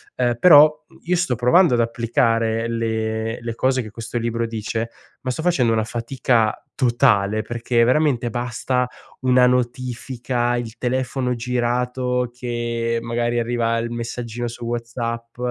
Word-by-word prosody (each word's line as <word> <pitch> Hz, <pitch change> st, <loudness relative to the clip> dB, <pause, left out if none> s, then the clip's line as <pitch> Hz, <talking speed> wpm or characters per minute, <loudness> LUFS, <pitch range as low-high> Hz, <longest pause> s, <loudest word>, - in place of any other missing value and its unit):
Ehm, 120 Hz, -2 st, +1 dB
però, 155 Hz, -3 st, +7 dB
mhmm, -, -, -20 dB
io 180 Hz, +2 st, +1 dB
sto 175 Hz, -8 st, 0 dB
provando 125 Hz, -, +4 dB
ad 120 Hz, -, +2 dB
applicare 115 Hz, -1 st, +1 dB
le 110 Hz, 0 st, -2 dB
le 115 Hz, -1 st, -4 dB
cose 130 Hz, +2 st, +1 dB
che 110 Hz, -, -10 dB
questo 115 Hz, +2 st, -5 dB
libro 115 Hz, 0 st, -1 dB
dice, 115 Hz, +1 st, -3 dB, 0.3 s
ma 130 Hz, -, -4 dB
sto 130 Hz, +5 st, -3 dB
facendo 135 Hz, -10 st, +2 dB
una 110 Hz, -1 st, +1 dB
fatica 115 Hz, 0 st, 0 dB
totale, 110 Hz, -5 st, +2 dB
perché 120 Hz, +1 st, 0 dB
veramente 125 Hz, -2 st, +2 dB
basta 125 Hz, +1 st, -1 dB, 0.3 s
una 125 Hz, -1 st, +4 dB
notifica, 125 Hz, 0 st, -1 dB
il 115 Hz, -2 st, -6 dB
telefono 125 Hz, 0 st, -1 dB
girato, 125 Hz, +1 st, -1 dB
che 120 Hz, -1 st, -2 dB
magari 120 Hz, 0 st, -1 dB
arriva 115 Hz, -1 st, 0 dB
il 115 Hz, 0 st, -3 dB
messaggino 120 Hz, 0 st, -4 dB
su 120 Hz, 0 st, -7 dB
WhatsApp 115 Hz, 0 st, -4 dB
120 Hz, 140 wpm, -21 LUFS, 115-125 Hz, 0.3 s, però